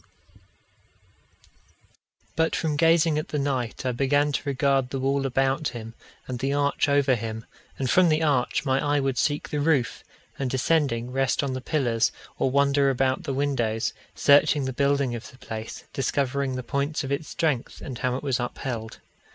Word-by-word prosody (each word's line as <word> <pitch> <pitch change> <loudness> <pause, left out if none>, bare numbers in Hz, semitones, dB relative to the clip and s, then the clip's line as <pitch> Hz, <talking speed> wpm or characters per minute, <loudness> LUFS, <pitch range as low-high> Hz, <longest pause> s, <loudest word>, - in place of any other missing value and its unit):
But 160 0 +1
from 155 -3 -1
gazing 165 0 +4
at 155 - -5
the 150 - -3
knight 130 -4 -2
I 130 - +1
began 145 +4 +2
to - - -1
regard 135 -1 +1
the 135 - -3
wall 135 +1 +1
about 135 +3 +1
him, 115 -1 -7 0.3
and 125 -2 -4
the 135 +2 0
arch 145 +1 +1
over 140 -2 +3
him; 110 -1 -4 0.3
and 135 - -1
from 180 +5 +5
the 155 +1 +2
arch 140 -2 +1
my 130 0 +1
eye 145 0 +2
would 135 -2 -1
seek 145 -1 0
the 150 - -2
roof, 145 -5 +1 0.4
and 135 -2 -1
descending, 130 -3 +1
rest 135 +1 +1
on 135 -2 -2
the 130 - -4
pillars, 125 -6 +1 0.3
or - - +2
wander 140 +1 +3
about 130 0 +1
the 140 - -2
windows, 120 -6 0 0.2
searching 145 0 +4
the 130 - -3
building 140 -1 +1
of 120 0 -6
the 130 - -17
place, 110 -3 -7
discovering 135 0 -1
the 130 - -4
points 140 +5 -1
of 135 - -5
its 145 +2 -2
strength, 145 -6 -1
and 130 -3 -7
how 125 -1 0
it 130 - -5
was 135 -3 0
upheld. 120 -2 -4
135 Hz, 175 wpm, -25 LUFS, 125-145 Hz, 0.4 s, from